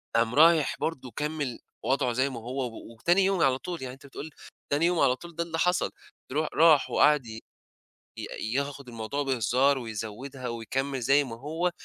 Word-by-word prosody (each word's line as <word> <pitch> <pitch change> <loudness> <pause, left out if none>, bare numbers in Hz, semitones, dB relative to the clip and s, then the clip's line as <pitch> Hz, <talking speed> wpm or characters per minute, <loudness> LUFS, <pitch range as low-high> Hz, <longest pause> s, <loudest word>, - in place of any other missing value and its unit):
قام 115 +1 +2
رايح 160 0 +5
برضه 130 -6 -3
كمِّل 150 -4 -3 0.3
وضْعه 130 -2 +1
زي 130 +3 +1
ما 125 -3 -6
هو 125 +4 -4
و 115 0 -10
وتاني 175 +12 +3
يوم 195 -2 +1
على 130 -4 +4
طول، 175 +2 -6
يعني 130 -1 -5
أنت 135 +2 -15
بتقول 140 +3 -8 0.4
تاني 145 +3 +3
يوم 175 -1 +2
على 125 - +4
طول 170 +4 -12
ده 170 - -1
اللي 165 -1 -4
حصل 180 +1 +2 0.4
ترو 155 +3 0
راح 155 -3 +5
وقعد 150 -3 +4
ي 110 -1 -7 0.8
ي 110 - -5
ياخُد 140 0 -3
الموضوع 115 +5 -3
بهزار 130 +2 +2
ويزوّدها 120 +3 -6
ويكمِّل 130 +4 -3
زي 140 +4 +4
ما 120 -4 -7
هو، 160 +6 -1
135 Hz, 180 wpm, -28 LUFS, 125-155 Hz, 0.8 s, رايح